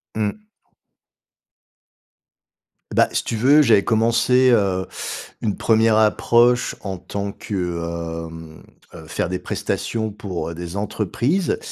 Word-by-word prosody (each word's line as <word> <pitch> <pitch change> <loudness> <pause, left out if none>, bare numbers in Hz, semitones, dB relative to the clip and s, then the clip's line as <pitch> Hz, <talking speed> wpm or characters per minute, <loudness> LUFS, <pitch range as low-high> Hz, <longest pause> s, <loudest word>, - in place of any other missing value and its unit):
Mmh. 110 - -2 2.5
Bah, - - +4
si - - 0
tu 115 - -3
veux, 140 +6 +5
j'avais 110 -7 +4
commencé, 115 +3 +3
heu, 95 -5 +2 0.6
une 105 -3 -1
1re 110 -1 +3
approche 120 +3 +3
en 95 -2 -5
tant 100 +3 -5
que, 105 - -7 0.7
hem, 80 -1 -11 0.3
heu, 80 -2 -11
faire 85 - -2
des 90 - -2
prestations 110 -2 -3
pour, 95 -6 -5
heu, 85 - -7
des 85 +2 -7
entreprises. 120 - -1
105 Hz, 120 wpm, -21 LUFS, 95-115 Hz, 2.5 s, veux